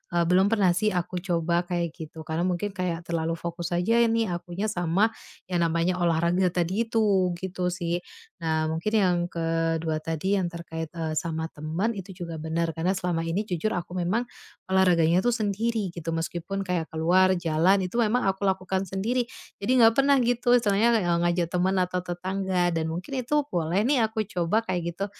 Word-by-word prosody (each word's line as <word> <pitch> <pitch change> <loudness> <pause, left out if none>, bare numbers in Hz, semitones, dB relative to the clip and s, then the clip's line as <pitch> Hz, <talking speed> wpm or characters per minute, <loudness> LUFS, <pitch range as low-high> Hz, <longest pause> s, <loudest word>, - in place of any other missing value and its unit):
eee, 170 - +4
belum 185 +2 +5
pernah 200 -4 +3
sih 210 +4 +1
aku 180 +1 -2
coba 170 -1 0
kayak 175 -2 -1
gitu. 160 0 -8
Karena 160 +3 -2
mungkin 185 +3 -1
kayak 180 -3 -3
terlalu 165 0 0
fokus 170 +1 -5
aja 225 +7 +2
ini 230 -2 +2
akunya 175 +4 -3
sama 175 +4 +2 0.4
yang 175 -2 +1
namanya 170 +2 +1
olahraga 170 +2 +2
tadi 185 +6 0
itu, 200 -5 +2
gitu 180 0 -3
sih. 175 -1 -2 0.4
Nah, 160 -1 0
mungkin 165 +6 -2
yang 185 -4 +3
ke-2 165 -1 -1
tadi 165 +6 -1
yang 180 - 0
terkait, 165 -2 -6
eee, 160 -1 -2
sama 160 -1 -4
teman 160 +9 -2
itu 195 -3 -8
juga 165 -2 -6
bener. 165 +1 -1
Karena 175 +4 -1
selama 175 -2 -1
ini 165 +5 0
jujur 180 +4 -1
aku 175 +1 -4
memang 180 +7 +1 0.5
olahraganya 175 -3 +4
itu 245 - +3
sendiri 215 -1 -1
gitu. 165 -1 -5
Meskipun 170 +4 -3
kayak 175 -3 -2
ke - - -7
luar 185 +3 +4
jalan 175 +4 +3
itu 185 +4 -4
memang 235 +2 +2
aku 195 +1 0
lakukan 190 0 0
sendiri. 225 +7 -1 0.3
Jadi 200 +5 -2
enggak 225 +1 +6
pernah 275 +1 +5
gitu 245 +1 +2
istilahnya 230 -1 +3
le 225 - +4
e - - +3
ngajak 175 -1 +1
teman 185 +2 +1
atau 180 0 -2
tetangga 185 0 -1
dan 165 -2 -1
mungkin 180 - -4
itu 295 +4 +2
boleh 170 +3 0
nih 245 0 +3
aku 220 0 -2
coba 180 +4 +1
kayak 175 -5 -3
gitu. 195 +4 -3
180 Hz, 185 wpm, -26 LUFS, 170-200 Hz, 0.5 s, enggak